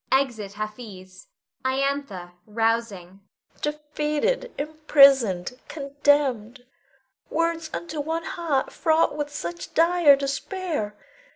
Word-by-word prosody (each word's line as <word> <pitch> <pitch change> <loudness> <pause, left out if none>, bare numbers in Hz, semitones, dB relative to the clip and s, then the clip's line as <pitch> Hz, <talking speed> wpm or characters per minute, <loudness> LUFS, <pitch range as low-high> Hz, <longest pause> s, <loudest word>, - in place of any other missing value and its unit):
[Exit 240 -7 0
Hafiz. 210 - -8 0.4
Iantha 260 -9 -2 0.2
[rousing]. 215 -4 -1 0.4
Defeated, 300 +11 -1
imprisoned, 275 - +4
condemned, 280 -5 0 0.6
words 330 0 -1
unto 320 -3 -4
one 325 +3 -3
heart 320 -5 -1
fraught 320 -1 +2
with 295 -1 -3
such 170 -11 -6
dire 335 -3 +6
despair. 275 - -3
275 Hz, 85 wpm, -24 LUFS, 215-305 Hz, 0.6 s, dire